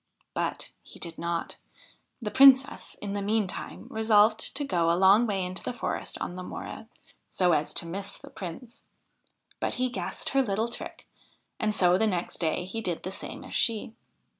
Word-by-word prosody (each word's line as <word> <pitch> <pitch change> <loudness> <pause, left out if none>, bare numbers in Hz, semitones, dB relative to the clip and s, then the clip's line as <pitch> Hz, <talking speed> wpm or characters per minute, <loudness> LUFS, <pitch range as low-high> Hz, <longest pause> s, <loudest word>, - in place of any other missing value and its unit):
But - - -3
he - - -14
did 170 -1 -6
not. 170 0 -3 0.7
The 210 - -2
Princess 270 +3 +6
in 200 -1 -3
the 205 - -2
meantime 205 -2 -2
resolved 220 0 +4 0.2
to 290 - -1
go 170 -8 +1
a 170 - +3
long 195 +5 +6
way 195 -3 -1
into 185 +1 -5
the - - -4
forest - - -3
on 175 - -4
the 185 - -6
morrow, 180 - -7 0.4
so 180 -1 +2
as 150 -2 +1
to - - +4
miss 195 +4 -4
the - - -13
Prince; 195 +6 -8 0.8
but - - 0
he 255 0 0
guessed - - -3
her 275 - +3
little 220 -1 0
trick, 235 - -7 0.5
and 215 -1 +1
so 180 0 +4
the 220 - +3
next 180 -4 -2
day 165 +1 0
he 225 +5 -4
did 175 -6 -2
the 185 - -4
same - - -8
as - - -10
she. 225 -1 +1
200 Hz, 185 wpm, -28 LUFS, 180-225 Hz, 0.8 s, Princess